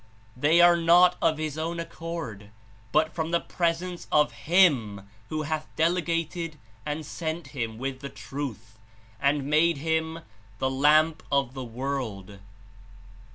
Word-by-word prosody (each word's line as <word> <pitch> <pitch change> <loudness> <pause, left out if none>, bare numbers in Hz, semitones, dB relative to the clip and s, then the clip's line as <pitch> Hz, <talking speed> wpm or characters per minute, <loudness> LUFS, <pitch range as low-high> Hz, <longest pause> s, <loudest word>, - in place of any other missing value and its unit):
They 150 +7 +4
are 175 0 +7
not 175 +2 +5
of 160 -2 +2
his 155 -1 -3
own 170 +2 -3
accord, 165 -11 -6 0.4
but 160 +5 +2
from 160 -1 -2
the 170 0 +2
Presence 175 +1 -2
of 150 -5 +4
Him 115 - +2 0.2
who 155 0 -2
hath 155 0 -3
delegated 165 -1 -1 0.3
and 150 +1 -3
sent 160 +2 -5
Him 115 -5 -4
with 130 +1 -4
the 140 +1 -7
Truth, 115 -7 -7 0.4
and 140 0 +2
made 155 +2 +3
Him 160 +2 -1 0.4
the 130 +3 0
Lamp 150 +4 +4
of 140 -3 +2
88 - - -20
the 130 -2 -6
world." 115 -6 -5
155 Hz, 140 wpm, -27 LUFS, 130-165 Hz, 0.4 s, are